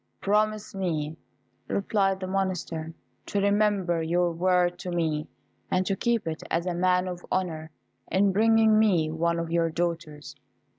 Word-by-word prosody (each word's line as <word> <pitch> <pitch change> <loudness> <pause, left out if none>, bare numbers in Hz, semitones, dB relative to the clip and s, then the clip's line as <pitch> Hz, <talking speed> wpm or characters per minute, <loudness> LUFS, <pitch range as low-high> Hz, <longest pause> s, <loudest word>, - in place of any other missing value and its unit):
"Promise 215 +1 0
me," 160 -5 -2 0.5
replied 195 -1 0
the - - -2
Monster, 180 -4 -3 0.3
"to 205 - -1
remember 200 -4 +2
your 175 +2 +1
word 180 +1 +1
to 180 - -5
me, 160 -3 -1 0.4
and 185 0 +1
to 195 - 0
keep 235 +1 0
it 160 -1 -4
as 170 +1 0
a 180 - -1
man 180 +1 +2
of 180 -1 -6
honour, 160 -4 -2 0.4
in 195 +1 +3
bringing 220 +1 +4
me 175 -8 +3
one 170 +1 0
of 165 -1 -3
your 165 -1 +2
daughters." 155 -4 -4
180 Hz, 150 wpm, -27 LUFS, 165-195 Hz, 0.5 s, bringing